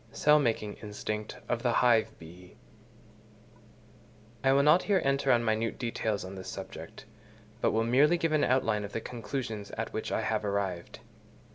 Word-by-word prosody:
Cell 150 0 +4
making 115 -6 -1
instinct 105 +1 -5
of 120 -1 -1
the 120 -2 +1
Hive 115 -3 +3 2.2
Bee.—I 135 - +3
will 140 +1 +4
not 150 +5 +6
here 200 -2 +2
enter 140 0 +2
on 120 -1 +3
minute 110 0 0
details 110 -4 -2
on 95 - -8
this 95 -1 -8
subject, - - -9 0.6
but - - +3
will 110 +1 +1
merely 140 +8 +4
give 165 -1 0
an 155 -1 +2
outline 110 -5 +1
of 100 - -7
the - - -1
conclusions 115 -3 -5
at 115 - -4
which 110 - -4
I - - 0
have 110 0 -1
arrived. 100 -1 -3
115 Hz, 160 wpm, -29 LUFS, 105-135 Hz, 2.2 s, not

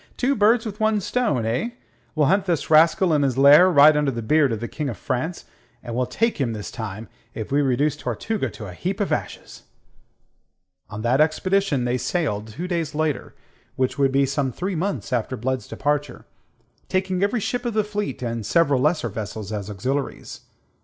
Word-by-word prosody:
"Two 265 +2 +2
birds 220 +2 +3
with 215 0 -6
one 215 -1 +2
stone, 195 - 0
eh? 125 - -1 0.4
We'll 155 -2 +3
hunt 195 +6 +2
this 165 -5 -1
rascal 165 +3 +5
in 150 - +3
his 135 -3 0
lair, 145 +7 +7
right 150 -2 +7
under 150 -1 +1
the 120 -3 -4
beard 145 +3 +3
of 110 - -2
the 120 - -4
King 150 +1 -4
of 115 - -6
France, 160 +8 -3 0.4
and 120 -2 -6
we'll 125 0 0
take 225 - 0
him 120 -4 0
this 105 -2 -6
time, 110 -1 -6 0.3
if 110 +1 -6
we 145 +1 +3
reduce 140 +2 +1
Tortuga 160 - -3
to 110 - -9
a 90 - -8
heap 185 - -3
of 205 - -1
ashes." - - -4 1.3
On 110 0 -7
that 125 +5 +3
expedition 160 -3 +1
they 125 +1 0
sailed 110 - -2
two 140 +12 -6
days 165 -5 -2
later 155 -3 -2 0.4
which 130 +1 -1
would 135 -1 +3
be 135 +1 +3
some 135 0 -1
three 185 - -3
months 180 -4 -3
after 125 +1 -1
Blood's 130 +2 -3
departure 145 -2 -2 0.6
taking 185 -1 -1
every 205 +4 +1
ship 245 +4 -2
of 240 -3 -3
the 215 - +3
fleet, 210 -10 -4
and 115 -2 -3
several 140 +4 +2
lesser 150 -2 +1
vessels 105 0 -6
as 105 -1 -4
auxiliaries. 130 +8 -4
145 Hz, 190 wpm, -23 LUFS, 120-185 Hz, 1.3 s, lair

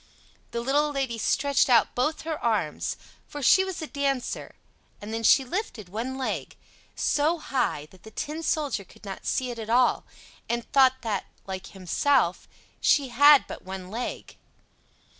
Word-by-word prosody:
The 235 - -3
little 290 +4 +1
Lady 265 -5 -2
stretched 280 +4 +2
out 235 -3 +4
both 300 +6 0
her 320 -1 -5
arms, 215 -10 -1 0.3
for 290 -1 -7
she 380 +9 +6
was 380 -4 -5
a - - -2
dancer, 275 -3 -2 0.4
and 210 +2 -7
then 225 - -2
she 265 +4 +5
lifted 250 - -4
one 240 +7 -4
leg 265 - -3 0.4
so 305 +4 +1
high 255 - -1
that 185 - -18
the 220 - -12
Tin 300 +8 -5
Soldier 290 -10 -1
could 190 - -18
not 195 -1 -7
see 255 -1 0
it 235 - -7
at 220 -1 -6
all, 245 +2 +3 0.5
and 235 -1 -1
thought 260 -2 +4
that, 210 -4 -2 0.2
like 190 -1 -6
himself, 190 - +1 0.3
she 280 -3 +3
had 285 +4 +7
but - - -8
one 190 0 -8
leg. 235 +3 -5
250 Hz, 160 wpm, -26 LUFS, 220-285 Hz, 0.5 s, had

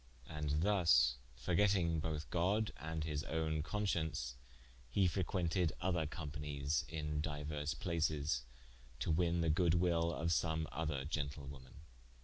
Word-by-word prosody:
And 75 0 -1
thus 80 -12 +5 0.2
forgetting 85 +4 +2
both 75 -1 -3
God 100 +6 +1
and 80 +1 -3
his 75 -2 -2
own 80 -1 0
conscience, 80 - -1 0.5
he 95 +10 +3
frequented 90 -1 +1
other 90 -4 +1
companies 75 -2 -2
in 75 -2 -2
diuerse 75 -1 -3
places, 75 -5 0 0.6
to 65 - 0
winne 85 +1 +2
the 80 -1 +3
good 85 +1 +3
will 85 -1 +2
of 85 0 -1
some 80 +3 +1
other 75 -2 -2
gentlewoman. 70 -3 -5
80 Hz, 125 wpm, -37 LUFS, 75-85 Hz, 0.6 s, thus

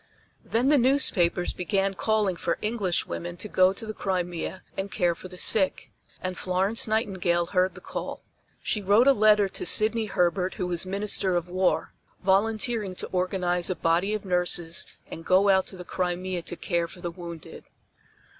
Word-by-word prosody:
Then 240 +4 +1
the 295 -2 +5
newspapers 235 -10 +2
began 195 +1 0
calling 210 -2 +1
for 170 0 -2
English 210 -5 0
women 175 0 -6
to 210 - -3
go 185 -2 +4
to 195 - -6
the 215 - -5
Crimea 180 -2 -3
and 195 +1 -4
care 175 -4 +1
for 175 - -10
the 180 0 -12
sick, 190 +1 +1 0.3
and 185 0 -3
Florence 190 +6 0
Nightingale 190 -6 0
heard 185 +1 +1
the - - -11
call. - - -6 0.4
She 210 - 0
wrote 205 +5 +4
a 275 - +7
letter 210 -3 +4
to 370 - -4
Sydney 220 -7 +4
Herbert 180 -1 0
who 185 - -2
was 175 0 -3
Minister 195 -1 0
of 175 0 -2
War, 185 +1 0 0.3
volunteering 210 +1 +1
to - - -4
organize 180 -1 0
a 185 - -1
body 175 +6 +1
of 210 - -6
nurses 175 -2 -1 0.2
and 165 - -7
go 190 +3 +4
out 190 -1 +3
to 190 - -6
the 180 - -8
Crimea 180 0 -2
to 175 - -5
care 170 -1 -1
for 180 - -13
the 175 -1 -4
wounded. 170 -2 -10
185 Hz, 175 wpm, -26 LUFS, 175-210 Hz, 0.4 s, a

